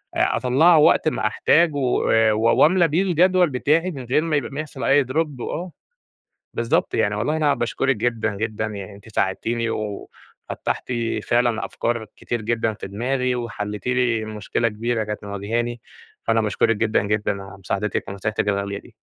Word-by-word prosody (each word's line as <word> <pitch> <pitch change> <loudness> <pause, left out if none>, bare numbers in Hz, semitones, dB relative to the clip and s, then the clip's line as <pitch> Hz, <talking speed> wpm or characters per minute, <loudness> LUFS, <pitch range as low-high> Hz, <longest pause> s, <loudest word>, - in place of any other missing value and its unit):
آآ، - - +2
أطلعه 155 +7 +4
وقت 155 +1 +4
ما 130 - +1
أحتاجه 160 +9 +3
و 130 -3 +1 0.3
وأملي 155 - +4
بيه 160 +5 +1
الجدول 180 -1 +3
بتاعي، 155 +7 +1
من 135 -6 -7
غير 130 +6 +2
ما 160 -2 -1
يبقى 145 - -1
ما 140 - -5
يحصل 145 -3 -6
أي 140 +1 +4
Drop. 145 +1 -2
وآه، 175 +8 -4 0.8
بالضبط. 115 0 0
يعني 105 - +1
والله 125 +10 -1
أنا 150 -2 +2
باشكرِك 125 +1 0
جدًا، 110 -2 -1
جدًا، 110 0 -2
يعني 100 -1 -7
أنتِ 100 +3 -15
ساعدتيني 115 +3 -1
وفتَّحتِ 105 +4 -5 0.3
فعلًا 120 -2 +1
أفكار 120 -1 -2
كتير 120 - -3
جدًا 115 0 0
في - - -8
دماغي، 125 +5 -1
وحليتِ 105 -3 -5
لي 125 -3 +1
مشكلة 110 +2 -1
كبيرة 115 +1 -2
كانت 105 0 -5
مواجهاني، 115 +4 -3 0.4
فأنا 115 0 +2
باشكرِك 110 +1 +1
جدًا، 110 +1 +1
جدًا 105 -1 -1
على 95 0 -11
مساعدتِك 100 +2 -2
ونصيحتِك 105 +2 -2
الغالية 100 0 -1
دي. 115 - -18
115 Hz, 160 wpm, -22 LUFS, 105-135 Hz, 0.8 s, أطلعه